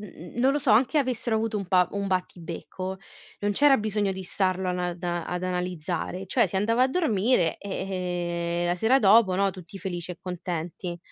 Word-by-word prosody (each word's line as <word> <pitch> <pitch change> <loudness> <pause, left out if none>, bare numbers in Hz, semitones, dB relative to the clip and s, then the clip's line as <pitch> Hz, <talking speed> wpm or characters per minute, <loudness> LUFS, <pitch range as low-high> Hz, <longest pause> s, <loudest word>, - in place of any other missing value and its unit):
n 210 - -8
n 175 +4 -11
non 260 +3 +4
lo 290 - +1
so, 285 -4 +1
anche 250 +8 +4
avessero 250 -4 0
avuto 220 0 0
un 195 - -3
pa 180 -1 +3
un 200 0 -3
battibecco, 185 +1 -4 0.4
non 205 - 0
c'era 280 +6 +5
bisogno 210 -3 0
di 190 0 -6
starlo 185 0 0
ana 180 -1 -1
da 175 -1 -3
ad 180 0 -3
analizzare, 180 0 -3
cioè 230 +3 +3
si 180 - -11
andava 225 +5 +2
a - - +2
dormire 235 - +2
e, 175 -3 -3
ehm, - - 0
la 175 +1 +1
sera 235 +8 +3
dopo, 205 -2 +6
no, 195 +1 +2
tutti 185 0 -11
felici 180 -3 -4
e 175 - -13
contenti. 175 -1 -5
190 Hz, 195 wpm, -26 LUFS, 175-215 Hz, 0.4 s, dopo